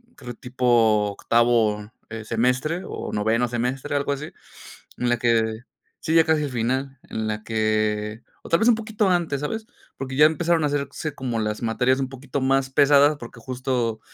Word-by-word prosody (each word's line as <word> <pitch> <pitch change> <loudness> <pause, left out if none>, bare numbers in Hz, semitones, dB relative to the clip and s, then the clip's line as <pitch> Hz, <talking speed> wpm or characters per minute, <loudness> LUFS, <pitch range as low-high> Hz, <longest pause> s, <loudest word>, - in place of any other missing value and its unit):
creo, 125 -3 -8
tipo 115 -4 +2
octavo, 110 -1 +1 0.2
eh, 110 -1 -7
semestre 125 - 0
o - - -6
noveno 110 +3 +1
semestre, 125 +4 -2
algo 140 0 0
así, 140 +1 -3 0.7
en 125 - 0
la 120 -1 +2
que, 115 -2 +1 0.4
sí, 160 - -1
ya 165 -1 +6
casi 155 -1 +1
al 145 - -3
final, 130 +3 -2
en 110 0 -3
la 105 0 -3
que, 110 0 -1 0.2
o - - -11
tal 165 - +3
vez 230 - +4
un 240 - +6
poquito 220 -2 -1
antes, 170 -6 0
¿sabes?, 220 +9 -4 0.3
porque 130 0 -5
ya 150 +2 +8
empezaron 165 0 +1
a - - +3
hacerse 145 +1 -3
como 120 -5 -3
las 105 +1 -3
materias 125 +3 +1
un 135 - -1
poquito 135 +1 -5
más 135 0 +2
pesadas, 145 +2 +5
porque 120 0 -11
justo, 125 -2 -2
125 Hz, 180 wpm, -23 LUFS, 115-145 Hz, 0.7 s, ya